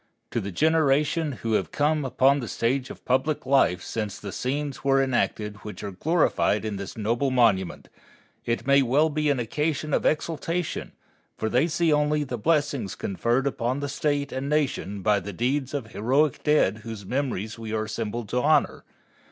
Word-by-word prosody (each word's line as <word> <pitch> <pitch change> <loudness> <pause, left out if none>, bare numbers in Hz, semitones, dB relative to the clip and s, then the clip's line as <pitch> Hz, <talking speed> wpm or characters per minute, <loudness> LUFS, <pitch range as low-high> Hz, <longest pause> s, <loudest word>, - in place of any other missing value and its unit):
To - - -1
the 100 - -5
generation 155 - +2
who 115 -1 0
have - - 0
come 150 +1 +1
upon 135 +2 +3
the 120 - -5
stage 130 +4 -1
of - - -11
public 130 +4 0
life 130 -10 +3
since 105 -2 -4
the 100 - -6
scenes 140 +4 -3
were 135 0 +3
enacted 110 -5 0
which 105 +1 -9
are 100 - -4
glorified 130 - +1
in 105 -2 -3
this 100 +2 -7
noble 115 +5 0
monument, 115 -8 +2 0.6
it 115 +2 -2
may 140 +1 +5
well 140 +5 +3
be 150 0 0
an 140 -3 +1
occasion 150 +5 -1
of - - +2
exultation, 165 +2 -1 0.4
for 110 - -1
they 130 +8 +3
see 165 -1 +2
only 150 0 +2
the 125 -4 -5
blessings 145 -6 0
conferred 120 +7 0
upon 130 -1 -1
the 145 - -3
State 145 0 -1
and 135 +2 -3
Nation 130 -10 -1
by 105 -1 +3
the 100 +2 -7
deeds 130 +6 -1
of 145 -3 -2
the 110 - -16
heroic 135 +6 +1
dead 150 -9 +3
whose 110 -2 -8
memory 125 -4 -2
we 110 -1 -6
are 110 0 0
assembled 110 +1 -4
to 125 - 0
honor. 155 +3 +2
130 Hz, 180 wpm, -25 LUFS, 110-150 Hz, 0.6 s, may